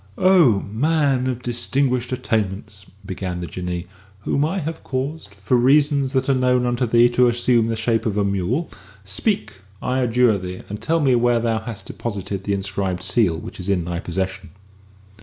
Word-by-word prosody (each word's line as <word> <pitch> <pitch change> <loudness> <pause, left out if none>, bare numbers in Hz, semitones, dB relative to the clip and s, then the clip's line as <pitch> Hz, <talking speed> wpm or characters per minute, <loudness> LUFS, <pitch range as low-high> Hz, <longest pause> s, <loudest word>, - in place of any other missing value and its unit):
"O 170 - +5
man 135 +3 +1
of 125 -1 -3
distinguished 125 +1 -1
attainments!" 105 -4 -2 0.2
began 95 -2 -4
the 90 - -4
Jinnee, 90 0 -4 0.4
"whom 140 +7 0
I 165 +6 -1
have 160 -2 -4
caused, 130 -5 -4
for 100 +6 0
reasons 140 +2 +3
that 130 - +1
are 140 - +4
known 125 -1 +2
unto 120 0 0
thee, 120 +1 +5
to 125 +1 +3
assume 120 -1 +2
the 115 - -1
shape 115 +1 0
of 105 -1 -1
a 100 - +2
mule, 100 - -1 0.4
speak, 95 - -2 0.2
I 130 +1 -1
adjure 120 -3 +3
thee, 90 0 -7
and 105 +1 -6
tell 165 0 +1
me 135 -3 +3
where 120 0 +3
thou 115 -1 0
hast 110 -1 -8
deposited 100 -3 -5
the 100 - 0
inscribed 95 -2 -2
seal 95 -3 +2
which 80 - -9
is 90 +1 -5
in 90 -4 +1
thy 85 0 -3
possession." 95 -1 -4
115 Hz, 175 wpm, -21 LUFS, 100-130 Hz, 0.4 s, O